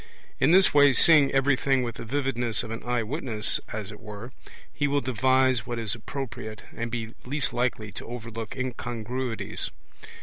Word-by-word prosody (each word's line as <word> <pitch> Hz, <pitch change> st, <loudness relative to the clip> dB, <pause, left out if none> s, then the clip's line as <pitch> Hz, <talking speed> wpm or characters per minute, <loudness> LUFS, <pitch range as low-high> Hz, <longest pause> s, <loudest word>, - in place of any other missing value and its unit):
In -, -, +4 dB
this 190 Hz, +2 st, +5 dB
way, 145 Hz, -1 st, +6 dB
seeing 150 Hz, -1 st, +6 dB
everything 135 Hz, -1 st, +2 dB
with 120 Hz, -1 st, -4 dB
the -, -, -7 dB
vividness 120 Hz, -3 st, 0 dB
of 110 Hz, -, -7 dB
an 115 Hz, -, -5 dB
eye 120 Hz, -1 st, -1 dB
witness 115 Hz, -4 st, +3 dB
as 105 Hz, -2 st, -5 dB
it 105 Hz, -, -11 dB
were, 105 Hz, +2 st, -9 dB, 0.4 s
he 145 Hz, -, 0 dB
will 145 Hz, 0 st, +1 dB
devise 130 Hz, 0 st, +2 dB
what 120 Hz, -1 st, -3 dB
is 115 Hz, -2 st, -1 dB
appropriate, 115 Hz, -2 st, -7 dB
and 115 Hz, 0 st, -4 dB
be 115 Hz, -1 st, -5 dB
least 140 Hz, +2 st, 0 dB
likely 120 Hz, -4 st, -1 dB
to 100 Hz, -, -9 dB
overlook 115 Hz, -2 st, -7 dB
incongruities. 120 Hz, -1 st, -4 dB
120 Hz, 165 wpm, -26 LUFS, 115-135 Hz, 0.4 s, way